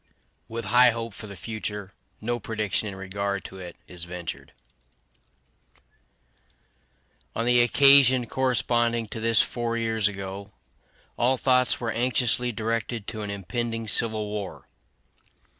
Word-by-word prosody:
With 115 -1 -4
high 125 +4 +6
hope 115 -1 -4
for 105 - -8
the 100 - -9
future, 105 +1 -5 0.3
no 120 +2 -1
prediction 110 -1 -2
in 100 - -6
regard 100 +1 -3
to 95 - -9
it 90 -2 -8
is 90 -2 -7
ventured. 90 -1 -7 2.8
On 115 - -1
the 120 0 +5
occasion 130 0 +6
corresponding 120 -2 +1
to 110 - -5
this 115 0 +4
four 120 -1 -2
years 110 -2 +1
ago, 100 0 -6 0.7
all 130 +2 +3
thoughts 125 -1 +3
were 115 -2 -2
anxiously 125 +1 +1
directed 115 0 -2
to 110 -2 -5
an 105 - -4
impending 115 +3 -3
civil 110 0 +2
war. 105 -2 -6
115 Hz, 125 wpm, -26 LUFS, 100-120 Hz, 2.8 s, high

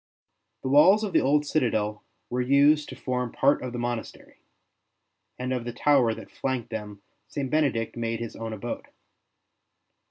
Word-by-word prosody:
The - - -2
walls 175 +10 +6
of 205 - -3
the - - +5
old 145 +2 +2
citadel 110 -8 0 0.3
were 125 +1 0
used 140 +4 +4
to - - -7
form 125 -2 -2
part 140 +2 +2
of 125 - -4
the 120 - -5
monastery, 120 -1 -5 1.0
and 125 +1 -2
of 125 -2 -2
the 120 - -4
tower 130 -6 +3
that - - -11
flanked 125 -3 -3
them 105 -2 -6 0.2
St. 140 -3 -4
Benedict 140 -8 +1
made 115 -1 -2
his 115 -1 -6
own 115 0 -5
abode. 110 +2 -5
125 Hz, 160 wpm, -26 LUFS, 115-140 Hz, 1.0 s, walls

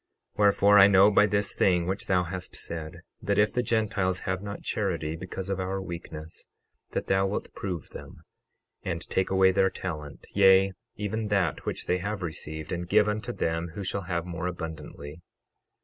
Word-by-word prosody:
12:35 - - -18
Wherefore, 100 0 +6
I 100 - +9
know 100 +1 +6
by 105 +1 +5
this 100 -1 0
thing 90 -2 +3
which 95 +3 -2
thou 90 -2 +3
hast 90 +1 -5
said, 80 -2 -7 0.2
that 100 0 0
if 105 0 +3
the 125 - +1
Gentiles 105 -6 0
have 95 0 -2
not 100 0 -7
charity, 85 -7 -2
because 95 +2 -6
of 95 -1 -2
our 95 +1 -2
weakness, 85 -3 -8 0.5
that - - -1
thou 95 0 +2
wilt 100 - -4
prove 90 -5 -5
them, - - -11 0.6
and 85 -2 -4
take 95 - +1
away 95 0 +5
their 95 0 +3
talent, 75 -7 -6
yea, 95 -1 +5 0.2
even 110 +1 -3
that 95 -6 0
which - - -3
they 90 - +1
have 100 +1 -3
received, 80 -2 -5
and 85 -1 -3
give 105 - +5
unto 110 +3 -2
them 85 -5 -2
who 100 - -4
shall 95 0 -3
have 85 -1 -1
more 85 0 -4
abundantly. 80 -3 -7
95 Hz, 180 wpm, -27 LUFS, 85-100 Hz, 0.6 s, I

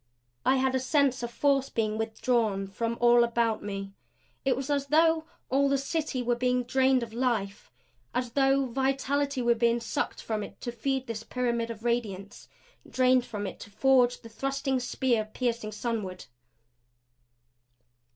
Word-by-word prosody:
I 265 - +4
had 260 0 +1
a 260 - +2
sense 265 -1 +2
of 240 - -3
force 275 +2 +1
being 215 -2 -1
withdrawn 220 -3 0
from 230 +4 -3
all 240 0 +6
about 235 -1 +1
me. 195 -1 -5 0.5
It 265 -2 +2
was 270 +2 -3
as 280 -1 0
though 320 +1 +3 0.2
all 275 +1 +2
the 275 - +2
City 275 -2 -2
were 240 0 +1
being 250 +1 +1
drained 260 0 +2
of 225 -1 -8
life 230 -5 -1 0.4
as 250 -1 -2
though 270 +1 +3
vitality 270 +1 0
were 235 0 +4
being 235 0 +2
sucked 230 - -3
from 220 -2 -2
it - - -9
to 240 - -3
feed 265 +3 -2
this 230 -3 -5
pyramid 235 -1 -1
of 225 -1 -7
radiance; 210 -5 -3 0.4
drained 255 -1 +3
from 205 -1 -4
it - - -6
to - - -10
forge 245 +3 +3
the 230 - -11
thrusting 270 +3 -1
spear 245 -2 0
piercing 230 0 -3
sunward. 210 -5 -4
245 Hz, 160 wpm, -28 LUFS, 230-270 Hz, 0.5 s, all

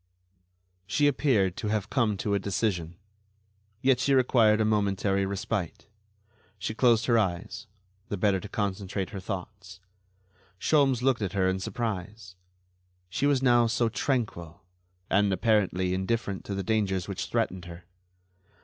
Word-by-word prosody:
She 145 +8 +1
appeared 125 - +2
to 105 - -3
have 105 -1 -2
come 115 -6 +1
to 100 +1 -2
a 100 - +2
decision... 95 -4 -2 0.9
yet 130 -2 +4
she 135 +2 +2
required 115 -4 +4
a 110 - +2
momentary 100 -2 +1
respite. 100 -2 -3 0.7
She 100 +3 -4
closed 115 -1 +3
her 115 -2 +4
eyes, 90 -5 -3 0.4
the 100 - -2
better 95 0 +2
to 105 - -9
concentrate 100 -1 -3
her 100 - -5
thoughts. 95 -1 -7 0.8
Sholmes 135 -2 +2
looked 130 -3 +2
at 100 -2 -2
her 95 -2 +2
in 95 0 0
surprise; 100 -2 -5 0.7
she 135 +9 0
was 140 -2 +2
now 120 -2 +5
so 115 +1 +1
tranquil 110 - -3 0.4
and, 100 0 +2
apparently, 95 -3 +1
indifferent 100 +1 -2
to 100 - -4
the 95 - -3
dangers 95 -3 0
which 100 -2 -4
threatened 90 -1 -2
her. 85 0 -11
100 Hz, 140 wpm, -27 LUFS, 95-115 Hz, 0.9 s, now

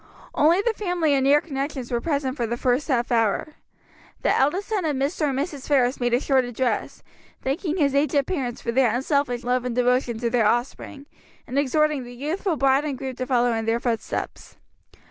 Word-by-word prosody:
Only 335 +7 +3
the 465 - +1
family 355 -7 0
and 270 -1 +2
near 290 +2 +5
connections 275 -4 -4
were 240 -1 0
present 280 -4 -1
for 240 -5 -2
the 235 +2 -3
first 250 +3 0
half 250 -4 0
hour. 225 +3 +1 0.7
The - - +3
eldest 325 +9 +1
son 420 -4 0
of 305 -3 0
Mr. 290 +3 0
and 265 - -2
Mrs. 285 -1 -4
Ferris 260 -3 +2
made 245 -1 +2
a - - +2
short 265 -2 +2
address, 245 -2 -2 0.4
thanking 310 +6 -2
his 285 -5 +2
aged 280 0 +2
parents 260 -9 -3
for 235 - -1
their 250 -1 +3
unselfish 265 -2 0
love 250 0 0
and 250 -2 -3
devotion 250 -1 +1
to 235 0 -2
their 230 -3 +3
offspring, 255 +4 -2 0.4
and 270 - -1
exhorting 295 0 +1
the 245 0 -10
youthful 320 - -2
bride 275 +1 +3
and 290 -3 -3
groom 265 0 -5
to 255 - -3
follow 245 -2 +2
in 225 -1 -2
their 225 +1 +1
footsteps. 235 -2 -4
265 Hz, 200 wpm, -24 LUFS, 245-295 Hz, 0.7 s, near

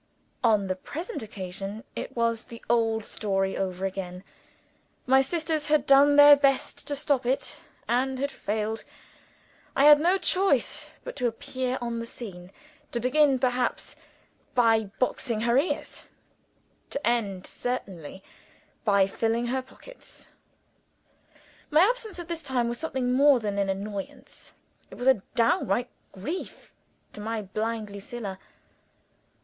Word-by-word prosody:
On 215 -4 +4
the 185 -1 -1
present 330 - -6
occasion, 195 0 -6
it - - -6
was 230 -1 0
the 230 - -10
old 225 -2 +1
story 195 -2 -1
over 185 0 -2
again. 185 -1 -5 0.8
My 265 +1 +5
sisters 315 +1 -1
had 295 -2 +3
done 280 +1 +6
their 290 0 +10
best 275 -1 0
to 285 - -1
stop 280 -2 +1
it, 255 +3 -1 0.3
and 260 +2 +1
had 280 +2 -2
failed. 215 +1 -3 0.9
I 275 - +4
had 295 0 +9
no 350 +5 +3
choice 385 0 +1
but - - -7
to 245 - +1
appear 260 +1 -3
on 235 -1 -3
the 230 - -5
scene 185 -7 -9 0.4
to 240 - -2
begin, 270 +3 +3
perhaps, 250 0 -1 0.6
by 225 -3 +4
boxing 235 -3 -1
her 235 +1 +2
ears: 285 +7 -1 0.8
to 280 - -3
end, 205 -6 0
certainly, 190 -8 -5 0.6
by 200 -3 +4
filling 225 +4 -1
her 265 - 0
pockets. - - -15 1.4
My 305 +1 +5
absence 440 0 +1
at 345 -2 -7
this 335 -1 -4
time 260 -5 0
was 235 0 -3
something 260 -6 -1
more 275 0 +6
than 205 -2 -2
an 200 -1 0
annoyance 195 0 -6 0.4
it - - -11
was 245 - -3
a 260 -7 +5
downright 235 0 +2 0.2
grief 295 - -6 0.4
to 210 - -8
my 220 0 -3
blind 215 +2 -3
Lucilla. 200 -1 -6
240 Hz, 135 wpm, -27 LUFS, 210-275 Hz, 1.4 s, their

